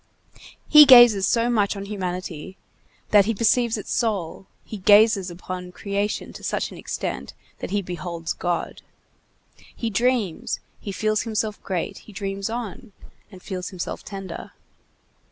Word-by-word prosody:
He 300 -1 +10
gazes 240 -7 +8
so 230 0 +2
much 205 -3 +1
on 200 0 -6
humanity 185 -3 -5 0.5
that 205 -2 +6
he 225 +1 -1
perceives 230 +1 +2
its 210 - -7
soul, 195 -6 -2 0.2
he 215 - -8
gazes 205 -1 +5
upon 180 +1 -7
creation 200 +2 -3
to - - -11
such - - -2
an - - -10
extent - - -5 0.2
that - - -5
he 205 0 -1
beholds 170 -1 -5
God. 175 -1 -3 0.9
He 230 -2 -3
dreams, 235 -5 0 0.2
he 200 - -6
feels 215 +2 0
himself 215 -2 -3
great; 180 -4 -3
he - - -15
dreams 195 0 -4
on, 230 -1 -6 0.4
and 185 -2 -13
feels 185 -3 -5
himself 185 -3 -6
tender. 195 -4 -8
200 Hz, 140 wpm, -23 LUFS, 185-220 Hz, 0.9 s, He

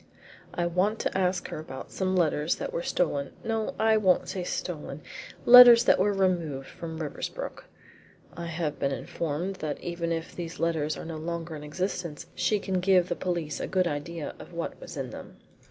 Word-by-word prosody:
"I 175 - 0
want 185 +6 +1
to - - -2
ask 185 -1 0
her - - -5
about 135 -4 -8
some 190 -1 -1
letters 155 -2 +2
that - - -5
were 170 - -1
stolen 145 -6 -1
no, 225 -1 -2
I 220 0 +4
won't 190 -4 +3
say 185 - -3
stolen 155 -5 -4 0.4
letters 240 -1 +11
that - - +4
were 205 +2 +3
removed 175 -8 0
from 160 -1 -7
Riversbrook. 155 -3 -5 0.7
I 170 0 -5
have 160 -3 -3
been 140 - +1
informed 170 +7 -3
that 150 -4 -4
even 170 -1 -3
if 165 0 -3
these 170 -2 -6
letters 160 -2 0
are - - -7
no 160 -1 -5
longer 165 0 -4
in 150 - -8
existence 170 0 -3
she 215 - +1
can 190 -2 -1
give 180 -1 +3
the 175 - 0
police 170 -5 -2
a - - -3
good 185 -1 +2
idea 155 0 -4
of - - -11
what - - -5
was - - -8
in - - -4
them." - - -10
170 Hz, 185 wpm, -28 LUFS, 155-185 Hz, 0.7 s, letters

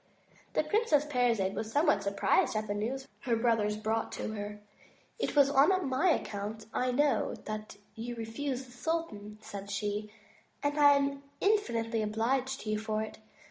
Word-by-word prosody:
The - - +2
Princess 415 -10 +2
Parizade 240 -9 +1
was 220 +1 -4
somewhat 295 +3 +3
surprised 200 +2 +2
at 215 0 0
the 205 - -2
news 250 +6 -3
her 240 -3 0
brothers 225 -3 +2
brought 220 +1 -1
her. 210 -1 -5 0.6
It - - -1
was 280 -1 +6
on 325 +7 +4
my 265 +8 +3
account, 215 -6 -2
I 250 0 +1
know, 275 -2 +2
that 215 -1 -5 0.2
you 235 +2 -5
refused 250 +4 -3
the 245 - -16
sultan," 245 -7 -3
said 200 -1 -8
she, 210 +1 -2 0.5
"and 290 0 +1
I 285 -1 +8
am 280 0 0 0.2
ini&nitely 230 - +1
obliged 250 +5 0
to 215 - -3
you 215 - 0
for 215 0 -1
it. 220 - -8
230 Hz, 160 wpm, -31 LUFS, 215-280 Hz, 0.6 s, I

